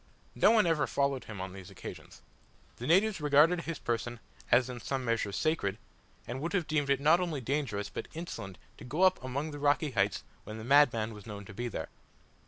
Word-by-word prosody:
No - - +5
one 220 -3 +5
ever 165 -3 +2
followed 140 -3 0
him 105 -3 -8
on 95 0 -5
these 95 -2 -10
occasions. - - -10 0.5
The 120 - -5
natives 195 +2 +3
regarded 150 +4 +5
his 165 -2 -4
person 120 0 -3 0.3
as 125 0 +5
in 125 -1 -6
some 135 +1 -3
measure 115 -3 0
sacred, 100 -6 0 0.5
and 125 +3 -5
would 170 +5 -3
have 180 -5 +1
deemed 150 -2 0
it 140 -1 +3
not 155 +5 +5
only 170 -5 -2
dangerous 125 -5 -2
but - - -5
insolent 125 - -6 0.2
to - - -10
go 150 +9 -1
up 185 -8 +4
among 140 +5 -3
the 145 - -7
rocky 145 +1 +2
heights 100 -5 +1 0.2
when 110 - -8
the 110 - -7
madman 120 -4 +4
was 105 0 -12
known 100 -2 -7
to 100 - -11
be 120 +4 -3
there. 115 - -5
135 Hz, 205 wpm, -31 LUFS, 115-155 Hz, 0.5 s, No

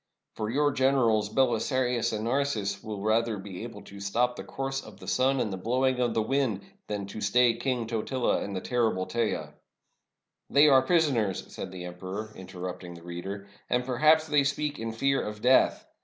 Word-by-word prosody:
For 110 -1 -3
your 145 +4 +2
gen 130 +1 +2
erals 110 -5 +2
Belisarius 125 0 +1
and 110 -1 -3
Narses 115 -6 -1
will 105 -2 -5
rather 110 0 +1
be 95 -2 -8
able 115 -3 -8
to 100 - -11
stop 120 +5 0
the - - -7
course 135 0 -3
of - - -13
the - - -11
sun 135 +1 +2
and 105 -5 -1
the - - -3
blowing 125 +6 +1
of 120 -2 +1
the 110 - +2
wind, 125 -5 0 0.3
than 105 -1 -3
to 100 +2 -8
stay 120 +4 +4
King 120 0 -2
Totila 120 +3 0
and 100 -1 -5
the 95 - -3
terrible 115 -7 0
Teja." 115 0 -2 0.5
" - - -58
They 145 +2 +8
are 135 -2 +7
prisoners," 130 - +1
said - - -6
the 90 -1 -7
emperor, 95 +5 -6
interrupting 90 -1 -7
the 85 - -13
reader; 95 +4 -6 0.2
"and 125 0 +1
perhaps 155 +5 +4
they 150 -2 +3
speak 145 +1 -1
in 115 0 -3
fear 135 +4 +1
of 105 0 -5
death. 130 +1 +4
115 Hz, 190 wpm, -28 LUFS, 100-130 Hz, 0.5 s, They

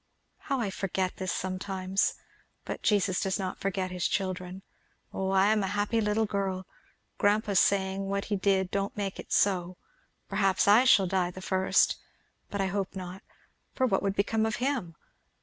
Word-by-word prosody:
How 275 -2 -2
I 210 -5 -1
forget 190 -1 -2
this 190 +1 -2
sometimes! 190 0 -1 0.5
But - - -5
Jesus 200 -3 +2
does 190 0 0
not 190 -2 -4
forget 190 -1 -2
his 180 -2 0
children. 185 -1 -3 0.5
Oh 190 0 -2
I 195 +2 +4
am 215 -1 +2
a 195 - -1
happy 210 +2 +1
little 210 +1 +1
girl! 195 -2 -2 0.5
Grandpa's 205 -1 +3
saying 195 0 +1
what 200 0 -1
he 210 - -1
did 190 -1 +1
don't 200 +1 -2
make 200 -2 -3
it - - -9
so 180 -2 +1 0.5
perhaps 195 -1 +2
I 215 +5 +7
shall 205 -7 +6
die 185 -1 0
the 180 - -9
first 190 0 +2 0.5
but 200 - -4
I 195 - +2
hope 195 0 -2
not, 185 +1 -7 0.5
for 260 - +2
what 195 -6 +1
would 195 0 -1
become 220 +2 +1
of 220 - -1
him! 245 - -2
195 Hz, 170 wpm, -29 LUFS, 185-205 Hz, 0.5 s, I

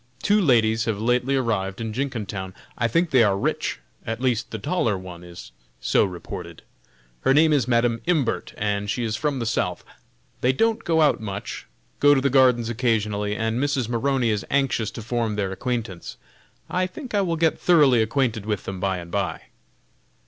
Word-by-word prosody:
two 210 0 +3
ladies 115 - +3
have 110 -3 -1
lately 125 +4 +1
arrived 100 -7 -1
in 110 -1 -4
Jenkintown; 105 -7 -4 0.2
I 115 - +1
think 165 +8 +1
they 130 - +5
are 100 -3 +2
rich, - - -1 0.3
at 115 0 -4
least 125 -3 0
the 110 - -5
taller 110 - 0
one 90 -2 -10
is 85 -6 -11 0.3
so 65 - +3
reported. 85 -2 -8 0.6
Her 135 - +2
name 155 +1 +5
is 135 -5 +2
Madam 115 -1 +2
Imbert, 155 -9 0
and 105 -1 -1
she 110 +4 -1
is 110 -2 -1
from 145 +4 -1
the 120 - -2
South. 90 -6 -1 0.6
They 130 +1 +3
don't 225 - +1
go 160 -1 +2
out 150 -6 +3
much; 100 -2 -6 0.3
go 145 0 +6
to 135 - +2
the 140 0 +1
gardens 125 -3 +4
occasionally, 105 -3 0
and 115 +2 -1
Mrs. 140 -4 0
Maroney 125 0 +1
is 105 -2 -1
anxious 135 -6 +1
to 115 - -8
form 115 -1 -1
their 100 -2 -1
acquaintance; 115 -3 -4 0.5
I 185 0 0
think 250 +6 -9
I 205 - +3
will 170 -3 0
get 160 0 +1
thoroughly 145 -9 +5
acquainted 115 -1 0
with 105 -2 -2
them 95 -1 -5
by 95 0 0
and 85 -1 -9
by." 100 -2 -2
115 Hz, 185 wpm, -24 LUFS, 105-135 Hz, 0.6 s, go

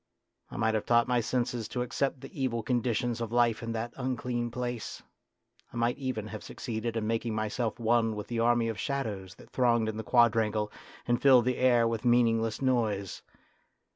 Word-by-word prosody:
I - - -8
might 110 -1 +1
have 110 - -1
taught 120 -1 +4
my 125 -1 +2
senses 120 -1 -1
to 125 - -2
accept 130 +2 -2
the 135 0 -8
evil 115 -3 -1
conditions 120 0 0
of 115 -1 -3
life 120 -2 +2
in 115 0 -4
that 115 +1 -4
unclean 125 -2 -2
place; 120 -1 -5 0.7
I - - -8
might 120 +2 0
even 130 -6 -3
have 110 - -7
succeeded 115 -1 -4
in 110 - -1
making 115 0 -1
myself 110 +2 -2
one 115 -1 +2
with 105 - -5
the 120 -1 -3
army 120 0 +3
of 110 -2 -4
shadows 105 -9 -3
that - - -17
thronged 120 -3 +2
in 110 0 -3
the 110 - -4
quadrangle 110 -3 +2 0.4
and 120 0 +1
filled 130 -4 +6
the 125 0 0
air 120 -2 +4
with 115 -1 -2
meaningless 115 -1 +2
noise. 110 -7 0
115 Hz, 185 wpm, -29 LUFS, 110-125 Hz, 0.7 s, filled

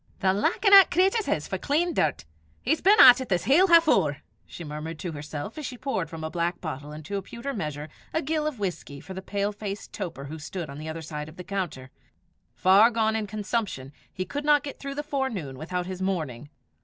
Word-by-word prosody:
"The 190 -1 +2
likin' 395 - +2
'at 390 -1 +10
cratur 390 +5 +2
his - - -1
for - - -3
clean 330 +4 0
dirt! 150 - 0 0.3
He's 305 +6 0
been 410 +3 +5
at 250 0 +10
it 260 - -6
this 180 -3 +1
hale 335 +9 +5
half 335 -2 +7
hoor!" 145 - +2 0.2
she 170 - -9
murmured 155 +1 -6
to 175 +2 -5
herself 150 - -6
as 300 - -5
she 250 - -7
poured 190 - -2
from 165 -1 -7
a 160 - -4
black 175 0 -1
bottle 150 -3 -6
into 155 +7 -5
a - - -3
pewter 235 +7 -6
measure 150 - -4 0.2
a 320 - -1
gill 305 +1 -1
of 300 -5 -4
whisky 180 -8 -4
for 190 - -9
the 190 - -6
pale 200 +1 -2
faced 205 -1 -7
toper 175 -9 -5
who 155 +3 -7
stood 160 0 -6
on 140 - -9
the 155 +1 -6
other 160 +1 -6
side 150 -1 -6
of 155 - -15
the 180 - -7
counter: 170 -10 -4 0.6
far 195 +5 +6
gone 220 -2 +1
in 220 -1 -2
consumption, 205 - -3 0.2
he 185 - -4
could 290 +7 -4
not 295 -1 +4
get 285 - -7
through 275 0 -6
the 295 - -3
forenoon 265 - -3
without 175 +6 -4
his 185 0 -6
morning. 155 -9 -3
190 Hz, 225 wpm, -26 LUFS, -, 0.6 s, at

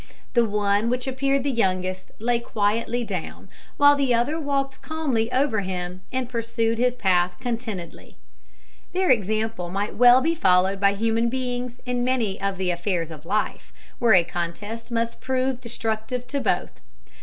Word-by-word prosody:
The 235 -1 +4
one 205 +1 +1
which 250 +1 -1
appeared 275 +1 0
the 280 - 0
youngest 185 -5 -1
lay 235 +2 +1
quietly 230 +2 0
down, 190 -7 -6 0.3
while 285 0 +7
the 270 -4 +2
other 285 +8 0
walked 275 -3 -2
calmly 270 -8 -1
over 255 -3 +2
him, 180 -1 -4
and 255 -1 -1
pursued 230 -1 -1
his 250 0 +2
path 180 -5 +2
contentedly. 225 -8 -5 0.8
Their 370 -2 +2
example 220 -4 0
might 200 +3 -2
well 245 +2 +7
be 320 +5 +1
followed 190 - +3
by 200 0 +4
human 225 +2 +1
beings 250 -1 -3
in 245 -1 -1
many 245 -6 0
of 195 -1 -1
the 185 -1 0
affairs 175 -1 -2
of 155 +1 -11
life, 210 +3 -2 0.3
where 230 -4 +5
a 175 - +6
contest 175 +7 -5
must 230 -1 -2
prove 260 -1 -1
destructive 235 +1 -3
to 280 - -1
both. 195 -7 -1
230 Hz, 155 wpm, -24 LUFS, 195-250 Hz, 0.8 s, while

